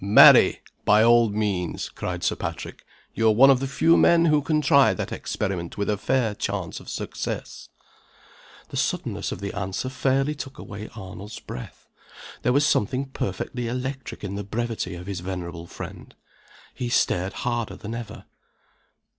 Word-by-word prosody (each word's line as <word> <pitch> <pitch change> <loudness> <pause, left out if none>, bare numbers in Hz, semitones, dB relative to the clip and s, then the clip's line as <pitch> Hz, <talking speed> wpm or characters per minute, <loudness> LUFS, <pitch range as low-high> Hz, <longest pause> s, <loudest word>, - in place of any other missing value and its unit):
"Marry, 100 +2 +8 0.2
by 105 +1 +5
all 120 -1 +5
means!" 100 -4 -2
cried - - -5
Sir - - +1
Patrick. - - -6 0.3
"You 115 - +2
are 110 - +6
one 135 +4 +8
of 130 - +3
the 135 - -2
few 160 +5 +4
men 170 0 +5
who 150 -2 +4
can 155 +1 +1
try 140 -2 +5
that - - -4
experiment 95 -5 -3
with 100 +1 0
a - - +1
fair 115 +1 0
chance - - -3
of - - -11
success." - - -5 1.0
The - - -5
suddenness - - -1
of - - -6
the 100 - -4
answer 95 +6 -3
fairly 135 +2 +1
took 135 -2 -8
away 105 +2 -8
Arnold's 100 +1 -8
breath. 60 - -9 0.5
There 125 - +2
was 140 +3 +3
something 135 +1 +1
perfectly 120 +1 -3
electric 130 +2 -5
in 100 -1 -4
the 100 0 -4
brevity 110 -3 -3
of 90 +1 -8
his 95 -2 -4
venerable 85 -2 -6
friend. - - -9 0.6
He 125 - -4
stared 95 -5 +1
harder 120 -2 -2
than 110 +1 -7
ever. 115 -1 -7
115 Hz, 165 wpm, -25 LUFS, 100-130 Hz, 1.0 s, Marry